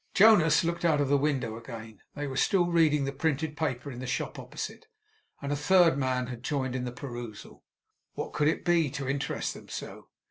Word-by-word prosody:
Jonas 175 -8 +6
looked 170 +1 -2
out 160 -3 +3
of 140 -2 +1
the 145 - +4
window 135 -6 -1
again. 115 -2 -9
They 145 - -3
were 135 -2 -5
still 175 +6 +3
reading 160 -4 +3
the 135 - -2
printed 150 +1 -1
paper 140 -3 -2
in 125 - -8
the 130 - -5
shop 130 - -3
opposite, - - -7 0.6
and 140 - -2
a - - +1
third 170 +2 +5
man 130 -2 0
had 120 -1 -7
joined 130 -1 -2
in 125 -1 -2
the 125 - -3
perusal. 120 -4 -8 0.5
What - - -5
could 150 - +2
it 155 - 0
be, 170 -4 +3
to 135 0 -5
interest 140 +2 -2
them - - -13
so? - - -7
140 Hz, 205 wpm, -29 LUFS, 125-160 Hz, 0.6 s, Jonas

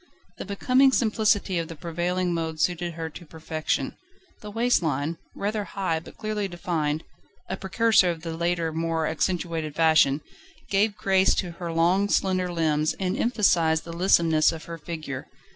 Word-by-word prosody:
The - - -5
becoming 255 +7 +3
simplicity 215 -6 +2
of 165 - -3
the 165 - -8
prevailing 175 +3 -1
mode 160 -1 -3
suited 175 +1 0
her 165 -1 -4
to 175 - -10
perfection. 160 -1 -3 0.5
The 210 - -8
waist 235 +2 +2
line, 155 +1 -2 0.2
rather 210 +1 -2
high 190 -5 -2
but 160 - -14
clearly 215 -2 -2
defined 165 -4 -2 0.4
a - - -3
precursor 195 0 +3
of 165 -2 -4
the 165 -1 -4
later 170 -1 -1
more 165 0 -1
accentuated 165 -1 -2
fashion 155 -3 +4 0.5
gave 205 +1 +2
grace 190 -2 +3
to 180 - -2
her 170 0 -6
long 180 +5 +2
slender 185 -2 +1
limbs, 155 -2 +1
and 185 -1 -1
emphasised 175 -9 +2
the 165 - -8
lissomeness 165 -3 +4
of 160 -1 -7
her 165 -1 -7
figure. 155 -4 -6
170 Hz, 160 wpm, -25 LUFS, 160-195 Hz, 0.5 s, fashion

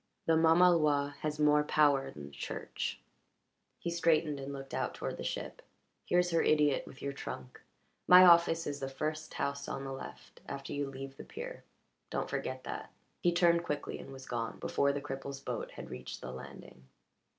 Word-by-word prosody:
"The 165 - +4
mamaloi 160 -3 +4
has 150 0 -3
more 150 0 +5
power 145 -2 +3
than 75 -1 -9
the 70 - -11
Church." 70 - -4 0.8
He 170 - -3
straightened 160 -3 +2
and 135 +1 -5
looked 135 -1 -8
out - - -1
toward - - -4
the - - -5
ship. - - -4 0.5
"Here's 175 0 +3
her 165 - +3
idiot 150 -2 +3
with 130 - -12
your 140 0 -2
trunk. 65 - -7 0.5
My 180 +1 +10
office 170 -1 +6
is 145 -1 -3
the 135 -1 -3
first 155 +3 -4
house 140 0 -2
on 135 - -4
the 135 - -5
left 135 - -10
after 140 0 -5
you 145 0 -1
leave 135 0 -8
the - - -8
pier. - - -8 0.5
Don't - - -2
forget - - -3
that." - - -6 0.3
He 175 - +4
turned 170 -1 +4
quickly 150 -3 -3
and - - -9
was 135 -1 -9
gone 115 -2 -3
before 140 0 +1
the 140 0 -3
cripple's 135 -1 -5
boat 140 - -4
had - - -9
reached 65 - -7
the 65 - -6
landing. 65 0 -11
145 Hz, 185 wpm, -33 LUFS, 135-165 Hz, 0.8 s, My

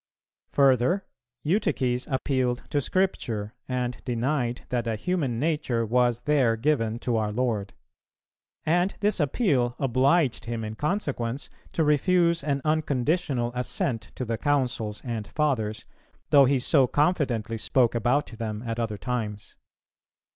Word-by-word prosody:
Further, 140 - +3 0.4
Eutyches 130 - 0
appealed 130 -2 0
to 145 - +1
Scripture, 120 - -1
and 125 -1 -3
denied 125 0 -1
that 120 -2 -1
a 115 - 0
human 140 - -1
nature 145 -6 0
was 120 +1 +2
there 130 -4 +2
given 115 -3 0
to 120 -1 -1
our 105 -1 0
Lord; 110 - -1 0.9
and 175 +4 +2
this 210 -1 +2
appeal 135 - +1
obliged 135 +1 +2
him 115 -1 -3
in 110 0 -4
consequence 140 - -2 0.2
to 165 - +2
refuse 170 +2 +3
an 140 -1 0
unconditional 145 -4 0
assent 125 -1 -2
to 130 - -3
the 115 -1 -2
Councils 125 -7 -1
and 115 -4 -4
Fathers, 120 -8 -1 0.5
though 140 -1 +8
he 135 +1 +3
so 130 +1 +4
confidently 125 -8 0
spoke 120 +1 +2
about 120 +5 +1
them 110 -1 -5
at 115 -1 -3
other 110 -3 -2
times. 110 -4 -4
125 Hz, 130 wpm, -26 LUFS, 115-150 Hz, 0.9 s, though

